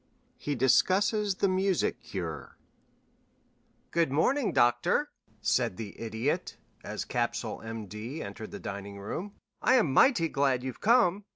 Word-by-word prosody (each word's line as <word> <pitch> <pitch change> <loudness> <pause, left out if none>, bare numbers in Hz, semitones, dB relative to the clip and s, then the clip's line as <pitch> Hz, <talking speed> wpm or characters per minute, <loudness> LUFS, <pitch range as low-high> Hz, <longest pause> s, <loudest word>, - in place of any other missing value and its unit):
XIII 145 - -2
HE - - -2
DISCUSSES 190 - +3
THE 200 - +1
MUSIC 190 -1 +1
CURE 90 -10 -6 1.3
"Good 165 -4 +1
morning, 235 - +2
Doctor," 120 0 +2 0.3
said 90 - +1
the 105 -2 -8
Idiot, 115 +10 -2 0.3
as - - -4
Capsule, - - -2
M.D., 115 - -6
entered 100 +2 -7
the - - -8
dining 100 0 -6
room, 175 - -5 0.3
"I 255 - +4
am 190 - +3
mighty 190 - +5
glad 135 -4 +1
you've 130 -1 -6
come. 210 -4 +3
140 Hz, 130 wpm, -29 LUFS, -, 1.3 s, mighty